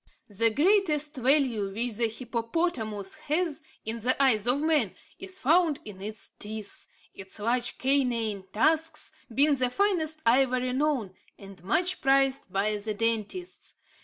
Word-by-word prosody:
The 230 +3 +3
greatest 305 - +2
value 250 -6 +2
which 225 +1 -2
the 235 -1 +3
hippopotamus 230 - -3
has, 315 0 0 0.2
in 225 +1 -3
the 250 +4 0
eyes 240 -6 +3
of 250 +3 +3
man, 300 - +1 0.2
is 375 +1 -7
found 320 +1 +3
in 200 -3 -9
its 215 +1 -5
teeth, 215 -1 -7 0.3
its 190 0 -9
large 240 +3 -1
canine 235 -7 0
tusks 310 +5 +1 0.2
being 285 +4 +4
the 250 -1 +2
finest 315 -2 0
ivory 255 +1 +3
known, 260 -8 0 0.2
and 195 -3 -13
much 350 - 0
prized 270 -5 +2
by 205 +3 0
the 210 +1 -4
dentists. 230 - -3
250 Hz, 135 wpm, -27 LUFS, 215-305 Hz, 0.3 s, being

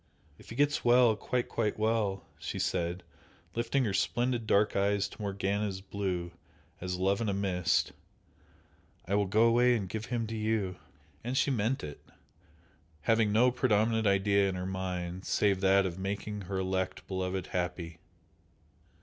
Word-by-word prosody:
"If - - -15
he 115 - -7
gets 145 +2 +2
well 120 -2 +5
quite, 125 +3 -2
quite 110 -3 -1
well" 110 -3 0
she - - -5
said, 90 0 -1 0.5
lifting 125 +3 0
her 100 - -1
splendid 120 +1 0
dark 105 +1 +3
eyes 100 0 +2
to 105 - -12
Morgana's 100 0 -1
blue 95 -3 -3 0.5
as 90 0 -3
"love 95 +3 +1
in 110 - 0
a 100 - 0
mist" 90 -4 +1 1.2
"I 95 - -2
will 100 -1 +2
go 110 +4 +3
away 120 +1 +5
and 100 -5 -2
give 110 +4 -4
him 120 -2 -1
to 110 +1 -5
you!" 110 -4 -1 0.5
And 125 +3 -2
she 140 - +3
meant 120 +2 0
it, 75 -1 -7 1.0
having 110 +1 +2
no 120 +4 +4
predominant 110 -3 +2
idea 100 0 +3
in 95 - -3
her 90 0 -4
mind 95 -1 -4
save 100 -2 +2
that 95 0 +4
of 90 0 -4
making 100 +2 -3
her 95 +1 -3
elect 95 0 -2
beloved 95 -1 -2
happy. 90 -2 -3
100 Hz, 160 wpm, -30 LUFS, 95-110 Hz, 1.2 s, well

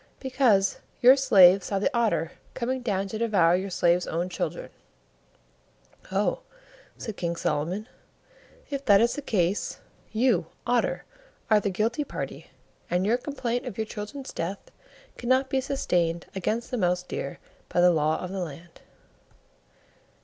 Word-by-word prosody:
"Because 250 -8 +2 0.2
your 255 +2 +8
slave 195 -8 +6
saw 200 - -2
the 205 +5 0
Otter 170 -9 +1 0.2
coming 255 +2 -2
down 200 -5 -1
to 215 - -5
devour 195 -7 +3
your 190 +2 -2
slave's 175 -1 +2
own 170 +3 -2
children." - - -4 1.4
"Oh," - - +1 0.6
said 220 -3 -6
King 170 -1 -2
Solomon, 170 +8 -2 0.8
"if 280 -1 -3
that 200 -4 +6
is 235 +2 +3
the 290 - -4
case, 195 -7 0 0.3
you, 220 -7 +2 0.2
Otter 245 0 +1 0.5
are 215 - +7
the 205 - -1
guilty 225 +9 0
party, - - -6 0.4
and 180 +2 +1
your 225 +4 +3
complaint 245 -3 -3
of - - -6
your 220 - -1
children's 220 +6 -7
death 185 +4 -5 0.5
cannot 260 +2 +1
be 265 - +2
sustained 175 -11 0
against 215 +5 -2
the 250 - -1
Mouse 180 -3 +1
deer 140 -5 -5 0.3
by - - 0
the 180 0 +6
Law 155 -1 +1
of 180 - -6
the 195 - -4
Land." 165 +2 -10
200 Hz, 145 wpm, -26 LUFS, 175-245 Hz, 1.4 s, your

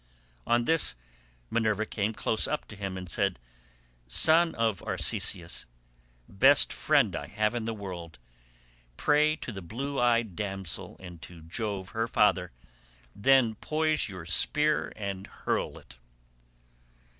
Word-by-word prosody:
On 120 0 +3
this 160 - +3 0.6
Minerva 110 -2 +1
came 105 0 -1
close 110 0 0
up 150 - -2
to 105 - -9
him 100 -2 -5
and 90 0 -7
said, 100 +2 +1 0.7
"Son 160 - +4
of 110 -5 0
Arceisius— 85 -1 0 0.6
best 135 +8 +4
friend 140 - +2
I 75 - -5
have 105 +5 0
in 120 -2 -3
the 115 - -2
world—pray - - -3
to 130 - -7
the 95 -3 -7
blue 135 +10 -4
eyed 115 -5 +2
damsel, 95 -4 -4
and 90 -3 -11
to 85 -2 -12
Jove 95 +2 -4
her 115 +1 -1
father; 95 -5 +2 0.6
then 125 +1 +4
poise 155 +4 0
your 90 -4 -8
spear 150 - +1
and 100 -2 -5
hurl - - -3
it." - - -15
105 Hz, 130 wpm, -29 LUFS, 90-120 Hz, 0.7 s, Son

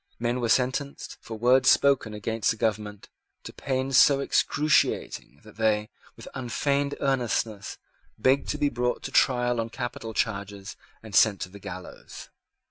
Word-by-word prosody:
Men 120 +2 -1
were 115 - -1
sentenced, 130 +3 -1
for 110 - -8
words 130 +3 +4
spoken 135 -6 +3
against 110 +1 -1
the 115 - 0
government, 105 -2 -3 0.4
to - - -9
pains 130 -1 -1
so 140 -1 +5
excruciating 140 - 0
that 105 -1 -16
they, 110 -1 +1 0.3
with - - -12
unfeigned 140 +3 -1
earnestness, 120 -6 -1 0.4
begged 130 +5 +2
to 150 - -1
be 145 -1 +1
brought 125 -1 -2
to 135 - -5
trial 125 -3 +2
on 115 - -5
capital 120 -3 -6
charges, 100 -3 -3 0.3
and 110 -2 -11
sent 100 -1 +4
to 90 - -4
the 100 +2 -13
gallows. - - -10
120 Hz, 150 wpm, -26 LUFS, 110-135 Hz, 0.4 s, so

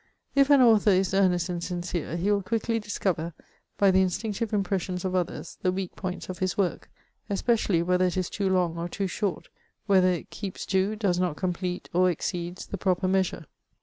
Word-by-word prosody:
If 275 0 +4
an 285 -2 +7
author 220 -4 +5
is 190 -1 +3
earnest 185 -3 +3
and 175 -2 -3
sincere, 175 -2 -3
he 190 +4 +1
will 200 -1 +2
quickly 225 +3 -1
discover, 180 -6 -2 0.4
by 200 -1 +5
the 190 0 +4
instinctive 210 +4 -1
impressions 190 -3 -1
of 185 - -1
others, 180 -1 -3
the 185 - +2
weak 185 -1 -4
points 185 -2 -5
of 185 -1 -6
his 185 -1 -1
work, 190 -4 -1 0.4
especially 200 -4 +1
whether 180 +1 +2
it 180 0 -1
is 185 -2 0
too 200 -2 -1
long 175 -3 +1
or 170 +1 -3
too 195 - -2
short, 190 +1 -3 0.4
whether 190 -3 +4
it 180 -2 -3
keeps 195 -3 -6
to, 190 +2 +1
does 195 -5 0
not 180 -5 0
complete, 180 0 -3
or 180 +1 +4
exceeds, 175 +1 -3
the 200 - -5
proper 185 -1 +1
measure. 185 -3 0
185 Hz, 190 wpm, -27 LUFS, 180-200 Hz, 0.4 s, an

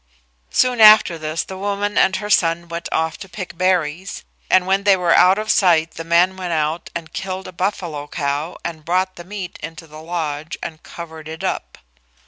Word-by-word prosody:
Soon 250 -2 +2
after 215 -6 +7
this 155 +1 -2
the 190 0 -9
woman 205 +1 -2
and 190 - +4
her 210 - -4
son 170 -2 +2
went 170 0 -5
off 160 0 -1
to 195 - -9
pick 180 -1 -7
berries, 180 -1 -1 0.3
and 185 -1 +4
when 195 +1 +2
they 200 -1 +5
were 175 -2 +2
out 185 +2 +6
of 215 0 0
sight 165 -4 +3
the 165 - -7
man 170 +3 +3
went 180 -2 -3
out 155 +1 -1
and 165 -1 -6
killed 190 0 -5
a - - -8
buffalo 170 -5 -3
cow 145 +2 -3
and 160 -2 -5
brought 185 +3 0
the 175 - -9
meat 190 -1 -7
into 165 0 -8
the 155 0 -12
lodge 160 -2 -4
and 160 -1 -6
covered 160 -2 -10
it 160 +1 -8
up. - - -3
175 Hz, 195 wpm, -20 LUFS, 160-190 Hz, 0.3 s, after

